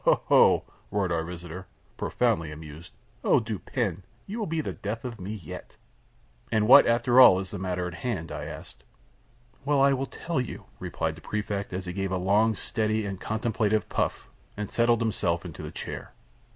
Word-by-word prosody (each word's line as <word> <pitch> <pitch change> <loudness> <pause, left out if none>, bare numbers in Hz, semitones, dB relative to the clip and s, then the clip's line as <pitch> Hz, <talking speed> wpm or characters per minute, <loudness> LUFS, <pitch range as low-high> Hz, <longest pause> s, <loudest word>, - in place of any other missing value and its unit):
ho! - - +6
ho! - - -15
ho!" - - +6 0.3
roared 100 -3 0
our 85 -1 0
visitor, 85 +2 -8 0.3
profoundly 80 -2 0
amused, 75 +2 -10 0.3
"Oh, - - +5
Dupin, 110 -3 -3 0.2
you 215 +4 -5
will 215 - -2
be 165 0 -1
the 155 - -2
death 110 +4 -5
of 115 -5 -6
me 95 +3 -5
yet!" 100 -8 -8 0.7
"And 105 -1 +2
what, - - +9
after 120 +2 +4
all, 95 -7 +9
is 95 0 -4
the 100 - -5
matter 90 -1 -2
on 90 - -4
hand?" 85 -2 -4
I - - -5
asked. - - -10 0.8
"Why, 140 -1 +4
I - - +3
will 135 0 -1
tell 165 -2 -2
you," 125 - -7
replied 80 -1 -2
the 80 - -13
Prefect, 105 0 -3
as 95 0 -4
he 90 - -4
gave 95 0 -2
a 95 - +1
long, 105 +4 +3
steady, 110 +1 -1
and 100 -2 -5
contemplative 110 -2 0
puff, - - -1 0.3
and 105 -1 -4
settled 115 0 +3
himself 90 -6 0
in 85 - -6
his 75 +1 -7
chair. - - -6
100 Hz, 190 wpm, -27 LUFS, 90-115 Hz, 0.8 s, what